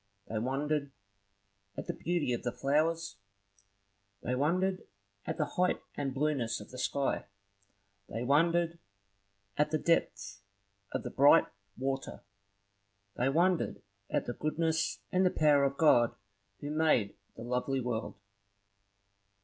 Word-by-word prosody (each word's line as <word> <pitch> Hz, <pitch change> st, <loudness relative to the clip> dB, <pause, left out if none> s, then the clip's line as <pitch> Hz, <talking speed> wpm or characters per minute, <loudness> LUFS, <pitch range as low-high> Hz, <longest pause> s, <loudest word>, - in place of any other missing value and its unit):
They 110 Hz, -, -3 dB
wondered 140 Hz, +4 st, -1 dB, 0.9 s
at -, -, -4 dB
the -, -, -3 dB
beauty 170 Hz, -6 st, -1 dB
of 120 Hz, -, -2 dB
the 120 Hz, -, -2 dB
flowers; 150 Hz, +2 st, 0 dB, 1.1 s
they 125 Hz, -, -1 dB
wondered 180 Hz, +8 st, 0 dB, 0.4 s
at -, -, -2 dB
the 150 Hz, -, +1 dB
height 180 Hz, +4 st, 0 dB
and 140 Hz, -2 st, -2 dB
blueness 135 Hz, -5 st, 0 dB
of 105 Hz, -, -12 dB
the 125 Hz, -, -8 dB
sky; 140 Hz, +1 st, -1 dB, 0.8 s
they 115 Hz, +2 st, -3 dB
wondered 165 Hz, +5 st, +2 dB, 0.8 s
at 150 Hz, -, +3 dB
the 155 Hz, -, +1 dB
depth 100 Hz, -12 st, 0 dB, 0.5 s
of -, -, -3 dB
the -, -, -5 dB
bright 145 Hz, +4 st, +6 dB, 0.3 s
water; 135 Hz, +1 st, -3 dB, 0.9 s
they 125 Hz, +2 st, +1 dB
wondered 175 Hz, +4 st, +1 dB, 0.3 s
at -, -, 0 dB
the 120 Hz, -, -3 dB
goodness 160 Hz, +3 st, -1 dB
and 185 Hz, -1 st, +3 dB
the 185 Hz, -, +5 dB
power 150 Hz, -4 st, +4 dB
of 140 Hz, 0 st, -1 dB
God 120 Hz, -7 st, +5 dB, 0.5 s
who 145 Hz, -, -4 dB
made 150 Hz, -10 st, +2 dB, 0.2 s
the -, -, -8 dB
lovely 125 Hz, +2 st, -1 dB
world. 120 Hz, -3 st, -3 dB
145 Hz, 130 wpm, -31 LUFS, 125-160 Hz, 1.1 s, bright